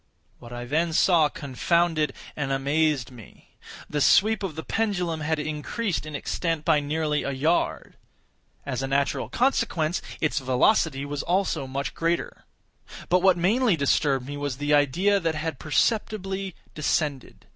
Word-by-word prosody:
What 120 - -12
I 120 0 -6
then 160 +5 0
saw 165 -3 +4
confounded 155 +3 0 0.2
and 140 -2 -2
amazed 140 -1 +1
me. 115 -6 -15 0.4
The 150 - -2
sweep 215 +8 +4
of 190 -6 -4
the 160 - -5
pendulum 180 -7 -1
had 155 +1 0
increased 155 +5 -3
in 150 - -6
extent 165 +1 -2
by 160 -3 +4
nearly 150 +1 -1
a - - -3
yard. 150 +6 -1 0.7
As 130 -2 -3
a 135 - -2
natural 140 0 0
consequence, 205 - 0 0.2
its 155 -1 0
velocity 130 +1 +2
was 145 0 -3
also 175 -6 0
much 135 +2 -3
greater. 165 +1 -2 0.6
But 180 0 +4
what 185 -1 +4
mainly 210 +4 +3
disturbed 140 -2 +1
me 145 +1 -6
was 145 -3 -3
the 145 +1 0
idea 175 +8 +3
that 165 -3 -1
had 155 -3 -4
perceptibly 195 - -1 0.2
descended. 150 -3 -2
155 Hz, 145 wpm, -25 LUFS, 140-175 Hz, 0.7 s, saw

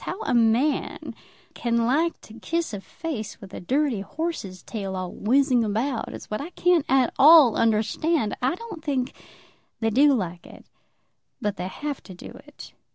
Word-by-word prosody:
How 380 - -4
a - - -1
man 240 +5 +1 0.4
can 235 -1 0
like 315 +8 +1
to 215 - -14
kiss 320 +5 -3
a 200 - -5
face 265 -4 -6
with 195 -1 -12
a - - -6
dirty 265 - 0
horse's 200 - -5
tail 195 -4 -5
all 185 -1 -4
whizzing 255 +1 +2
about 225 +4 -1
it, - - -7
is - - -9
what 215 - -4
I 305 - -6
can't 355 -3 +2
at 265 -2 +3
all 295 -5 +8
understand. 225 +4 +1
I 255 +6 +1
don't 400 -6 -9
think 270 -4 -1 0.7
they 225 -1 0
do 285 +6 +5
like 180 -6 -4
it, - - -14 0.7
but 205 -1 -2
they 180 - -3
have 290 +8 -5
to 185 - -12
do - - -10 0.2
it." - - -13
245 Hz, 175 wpm, -24 LUFS, 215-300 Hz, 0.7 s, all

